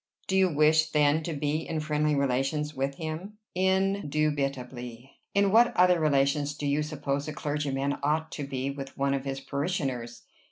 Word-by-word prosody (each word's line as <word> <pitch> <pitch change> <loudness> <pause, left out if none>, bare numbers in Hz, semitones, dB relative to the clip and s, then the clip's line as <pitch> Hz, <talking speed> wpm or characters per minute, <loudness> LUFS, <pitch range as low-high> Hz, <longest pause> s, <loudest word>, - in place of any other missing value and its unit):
"Do 190 - -1
you 190 -1 +4
wish, 155 +1 +4
then, 150 0 +3
to 165 +1 -4
be 145 +1 -1
in 160 0 -3
friendly 150 0 +1
relations 140 +3 0
with 135 0 -2
him?" 165 +7 -6 0.2
"Indubitably. 145 - -1 0.2
In 200 -1 +4
what 235 +3 +5
other 180 -1 +5
relations 145 -1 +2
do 145 - -4
you 145 +1 +1
suppose 145 -2 -3
a 155 - -4
clergyman 145 -2 -1
ought 155 +3 0
to 145 -2 -5
be 135 0 -2
with 135 -1 -8
one 140 0 +1
of 135 0 -2
his 135 0 -3
parishioners?" 135 -6 -3
145 Hz, 165 wpm, -28 LUFS, 140-155 Hz, 0.2 s, what